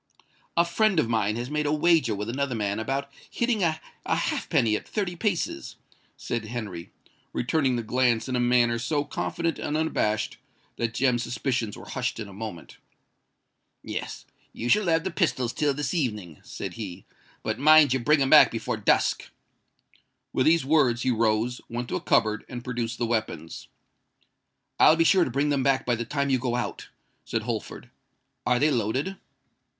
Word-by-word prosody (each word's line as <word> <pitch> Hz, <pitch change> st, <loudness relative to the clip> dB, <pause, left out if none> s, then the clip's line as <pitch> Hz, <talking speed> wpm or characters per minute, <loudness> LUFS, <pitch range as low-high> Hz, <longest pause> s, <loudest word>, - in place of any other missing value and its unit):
"A 170 Hz, -, +5 dB
friend 195 Hz, +1 st, +2 dB
of 135 Hz, -, +2 dB
mine 110 Hz, -2 st, +1 dB
has 120 Hz, +4 st, -4 dB
made 150 Hz, 0 st, 0 dB
a -, -, +1 dB
wager 155 Hz, -7 st, +3 dB
with 105 Hz, +1 st, -4 dB
another 130 Hz, +1 st, -2 dB
man 100 Hz, -1 st, -1 dB
about 135 Hz, +5 st, -2 dB, 0.2 s
hitting 235 Hz, -3 st, 0 dB
a 160 Hz, -3 st, +1 dB, 0.2 s
halfpenny 110 Hz, -2 st, +1 dB
at -, -, -5 dB
thirty 195 Hz, -5 st, -2 dB
paces," 175 Hz, -, -2 dB, 0.4 s
said 120 Hz, -2 st, -3 dB
Henry, 105 Hz, -7 st, -6 dB, 0.4 s
returning 135 Hz, 0 st, +1 dB
the 120 Hz, -, -2 dB
glance 120 Hz, 0 st, +1 dB
in 130 Hz, -, -2 dB
a -, -, +1 dB
manner 120 Hz, -1 st, +3 dB
so 145 Hz, +5 st, 0 dB
confident 165 Hz, +2 st, -3 dB
and 150 Hz, +1 st, -2 dB
unabashed, 110 Hz, -9 st, -1 dB, 0.4 s
that 115 Hz, -1 st, -2 dB
Jem's 125 Hz, -1 st, +2 dB
suspicions 115 Hz, -3 st, -2 dB
were -, -, -11 dB
hushed 125 Hz, -3 st, -3 dB
in 110 Hz, -, -5 dB
a 100 Hz, -, -12 dB
moment. 100 Hz, -4 st, -8 dB, 1.0 s
"Yes—you 120 Hz, -, -7 dB
shall 210 Hz, +7 st, +3 dB
have 165 Hz, -1 st, +2 dB
the 190 Hz, -, -3 dB
pistols 130 Hz, -, 0 dB
till 145 Hz, +2 st, +1 dB
this 145 Hz, +4 st, -3 dB
evening," 105 Hz, -, -3 dB
said -, -, -6 dB
he: 95 Hz, -5 st, -7 dB, 0.4 s
"but -, -, -2 dB
mind 155 Hz, -1 st, +7 dB
you 130 Hz, -, +1 dB
bring 145 Hz, +3 st, +3 dB
'em 135 Hz, -, -1 dB
back -, -, +9 dB
before -, -, -3 dB
dusk." -, -, +1 dB, 1.0 s
With 130 Hz, -, +2 dB
these 165 Hz, -3 st, +4 dB
words, 135 Hz, -5 st, +3 dB
he 130 Hz, -, +2 dB
rose, 115 Hz, +1 st, 0 dB
went 120 Hz, +1 st, -4 dB
to -, -, -2 dB
a -, -, -2 dB
cupboard, 110 Hz, 0 st, +2 dB
and 120 Hz, -2 st, -6 dB
produced 120 Hz, -2 st, -3 dB
the 120 Hz, -, -1 dB
weapons. 110 Hz, -8 st, -3 dB, 1.1 s
"I'll 155 Hz, -, +7 dB
be 165 Hz, -, +3 dB
sure 180 Hz, +1 st, +4 dB
to -, -, -3 dB
bring 140 Hz, +4 st, 0 dB
them 140 Hz, -2 st, +1 dB
back 135 Hz, 0 st, +1 dB
by 125 Hz, -, +1 dB
the 120 Hz, 0 st, -2 dB
time 140 Hz, +3 st, -1 dB
you 130 Hz, -, +3 dB
go 120 Hz, -1 st, -1 dB
out," -, -, -4 dB, 0.3 s
said 110 Hz, -1 st, -3 dB
Holford. 120 Hz, +1 st, -5 dB, 0.6 s
"Are 125 Hz, 0 st, +3 dB
they 150 Hz, +4 st, +3 dB
loaded?" 130 Hz, -, -1 dB
125 Hz, 175 wpm, -26 LUFS, 115-150 Hz, 1.1 s, back